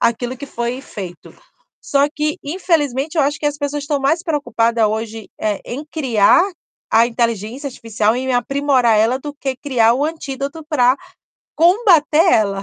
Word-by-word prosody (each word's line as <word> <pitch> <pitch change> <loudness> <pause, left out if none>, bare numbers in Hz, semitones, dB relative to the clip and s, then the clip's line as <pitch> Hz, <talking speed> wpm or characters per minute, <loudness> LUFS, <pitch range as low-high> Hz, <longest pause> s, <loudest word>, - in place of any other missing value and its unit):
aquilo 240 +2 0
que 285 - -8
foi 240 0 -4
feito. 190 -9 -9 0.5
Só 280 0 +2
que, 300 0 -1
infelizmente, 300 -3 -1
eu 310 - +4
acho 290 +2 0
que 295 - -1
as 290 0 -1
pessoas 290 0 -3
estão 285 0 -1
mais 310 +5 +1
preocupada 235 - +1
hoje, 220 0 -4
eh, 210 -2 -1
em 275 +5 -6
criar 255 -1 +4 0.5
a 225 +1 +5
inteligência 235 +2 -2
artificial, 225 -3 -1
em 260 +1 -2
aprimorar 255 -2 +2
ela 230 +4 +2
do 290 +1 -7
que 270 -2 -4
criar 245 -4 +2
o 275 +4 0
antídoto 295 -1 -5
para 255 -5 +3 0.6
combater 340 -3 +4 0.2
ela. 200 -3 +1
265 Hz, 155 wpm, -18 LUFS, 230-295 Hz, 0.6 s, a